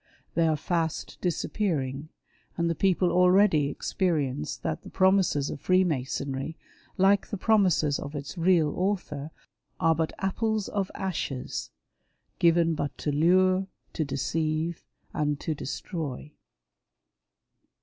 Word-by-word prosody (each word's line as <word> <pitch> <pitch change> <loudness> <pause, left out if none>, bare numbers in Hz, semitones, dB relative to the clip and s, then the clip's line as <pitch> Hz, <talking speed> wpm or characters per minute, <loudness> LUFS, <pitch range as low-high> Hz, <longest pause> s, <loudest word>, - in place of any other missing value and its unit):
They 165 0 +3
are 155 -1 +2
fast 165 0 -2
disappear 180 0 0
ing, 135 +3 -5 0.5
and 170 -1 +1
the 170 - +1
people 180 +1 +2
already 180 -3 +4
experience 150 -4 -1
that - - -3
the - - -11
promises 185 -7 +2
of 140 - -7
Freemasonry, 145 -4 0 0.4
like 195 +1 +4
the 205 - -4
promises 185 -8 +3
of 145 - -7
its 140 +3 -6
real 165 -3 +3
author, 180 -7 -2 0.5
are 165 - +4
but 160 0 -1
apples 215 +2 -1
of 200 -2 -1
ashes, 155 -9 -3 0.7
given 170 -1 +4
but 145 -2 -3
to 150 - -2
lure, 185 +5 +3 0.3
to 160 - -1
deceive, 155 +4 -2 0.3
and 150 -1 0
to 160 - -1
destroy. 150 -1 -5
165 Hz, 120 wpm, -27 LUFS, 145-185 Hz, 0.7 s, already